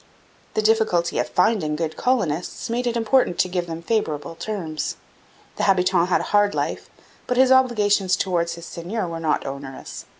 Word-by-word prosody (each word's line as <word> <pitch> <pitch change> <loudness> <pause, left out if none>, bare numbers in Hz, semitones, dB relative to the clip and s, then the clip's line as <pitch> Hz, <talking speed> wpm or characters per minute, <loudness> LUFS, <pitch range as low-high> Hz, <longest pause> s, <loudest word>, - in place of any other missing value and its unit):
The 215 - +1
difficulty 215 -6 +2
of - - -1
finding 170 -10 +2
good 160 0 -3
colonists 230 - -1
made 245 +1 -1
it 235 0 0
important 230 -5 +2
to - - +2
give 180 -1 -2
them 165 0 -6
favourable 165 -8 -1
terms. 165 -3 -4 0.6
The - - -1
habitant 180 -2 +3
had - - +3
a - - -7
hard 205 0 +4
life, - - -3 0.4
but 250 - 0
his 260 0 +5
obligations 210 -7 +3
towards 175 -3 0
his 170 0 -10
seigneur 180 +5 -4
were 165 -1 -5
not 160 -2 0
onerous. 135 -1 -7
185 Hz, 170 wpm, -23 LUFS, 165-220 Hz, 0.6 s, his